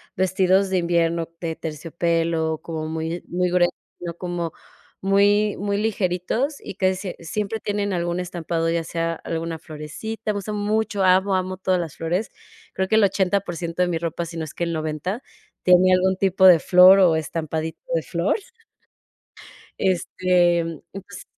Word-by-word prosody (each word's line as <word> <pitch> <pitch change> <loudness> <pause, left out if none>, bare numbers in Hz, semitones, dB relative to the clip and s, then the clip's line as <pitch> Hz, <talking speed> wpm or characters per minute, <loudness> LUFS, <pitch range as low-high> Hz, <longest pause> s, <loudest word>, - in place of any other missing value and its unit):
vestidos 190 +1 +2
de 190 - +1
invierno 170 -1 +1
de 165 -2 -3
terciopelo, 165 0 -1
como 160 -2 -5
muy 160 +2 -4
muy 180 +1 0
grueso, 175 0 +3 0.3
sino 170 -1 -5
como 175 -2 -4 0.5
muy 205 +2 +3
muy 200 0 -1
ligeritos 215 - -1
y - - -8
casi 190 -1 +1
siem 185 -1 -6
siempre 210 +6 -3
tienen 205 -1 -2
algún 175 0 -1
estampado, 170 -2 -2
ya 165 0 0
sea 165 0 -2
alguna 165 0 -4
florecita. 160 +9 -5
Me 205 - -3
gustan 210 +1 -4
mucho, 210 -1 0
amo, 190 +1 +4
amo 185 0 -2
todas 185 0 +1
las 165 -4 -5
flores. 175 +6 -1 0.4
Creo 190 - -1
que 220 - +2
el 220 - +5
80% 180 -3 0
de 180 - +3
mi 170 - 0
ropa, 170 +1 -3
si 165 0 -8
no 160 - -3
es 155 - -10
que - - -3
el 170 - -2
90, 160 - -3 0.4
tiene 180 +1 +5
algún 190 +1 +3
tipo 190 0 +2
de 175 -3 +8
flor 180 +4 +7
o 175 -4 +5
estampadito 160 0 -4
de 165 - +2
flor. 170 +4 0 1.4
Este, 180 -1 +2
mm, 165 -1 -6
ups 195 +1 -9
180 Hz, 165 wpm, -23 LUFS, 165-195 Hz, 1.4 s, de